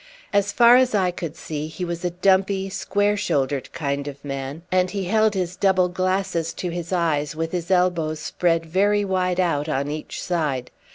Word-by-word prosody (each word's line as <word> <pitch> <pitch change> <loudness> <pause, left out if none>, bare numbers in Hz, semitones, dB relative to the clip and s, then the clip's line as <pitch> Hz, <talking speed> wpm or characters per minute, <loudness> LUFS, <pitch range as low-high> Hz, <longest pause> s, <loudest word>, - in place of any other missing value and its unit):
As 200 0 +2
far 240 0 +7
as 255 -3 +3
I 185 -3 +2
could 170 -3 -6
see, 155 -2 -5
he 180 +3 -5
was 170 0 -5
a 180 - +1
dumpy 190 +2 +2
square 205 +1 +1
shouldered 140 -9 -1
kind 140 -1 -3
of 140 0 -8
man, 135 +3 -5
and 185 0 +2
he 195 0 -3
held 215 +2 +2
his 180 -1 -2
double 185 -2 +3
glasses 185 -2 -1
to 180 - -3
his 170 0 -5
eyes 155 -5 0
with 165 +1 -3
his 175 -1 -3
elbows 175 -4 +1
spread 165 +1 0
very 205 +5 +2
wide 185 -1 0
out 160 -4 +1
on 140 0 -1
each 155 0 -6
side. 150 -8 -2
175 Hz, 185 wpm, -23 LUFS, 155-190 Hz, -, far